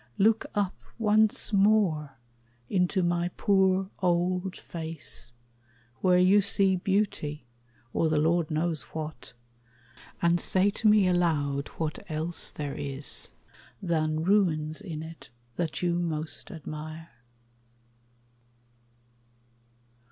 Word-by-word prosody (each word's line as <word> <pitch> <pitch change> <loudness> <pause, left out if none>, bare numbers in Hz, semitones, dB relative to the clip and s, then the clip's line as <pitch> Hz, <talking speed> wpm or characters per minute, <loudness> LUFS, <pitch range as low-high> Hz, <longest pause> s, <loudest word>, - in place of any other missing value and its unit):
Look 220 +2 +3
up 205 -2 -1 0.2
once 215 -1 +2
more 195 -9 +2 0.5
into 185 0 +1
my 175 0 0
poor 190 -1 +2
old 180 +1 0
face, 160 -7 -3 0.7
Where 180 -1 +3
you 185 +3 +5
see 195 -1 +3
beauty, 180 -7 -1 0.5
or 160 - +1
the 155 - +1
Lord 160 +1 +2
knows 160 -1 -1
what, 155 -4 -6 0.9
And 170 0 +2
say 190 +4 +2
to 215 - -1
me 210 -2 +5
aloud 150 -6 0
what 155 -2 -3
else 160 +2 -2
there 145 -2 -5
is 140 0 +3 0.5
Than 155 -4 -1
ruins 165 -4 +1
in 160 -6 -6
it 165 0 -11 0.3
that 160 0 -3
you 175 -1 +1
most 160 -2 -3
admire. 155 -1 -8
170 Hz, 105 wpm, -27 LUFS, 155-190 Hz, 0.9 s, you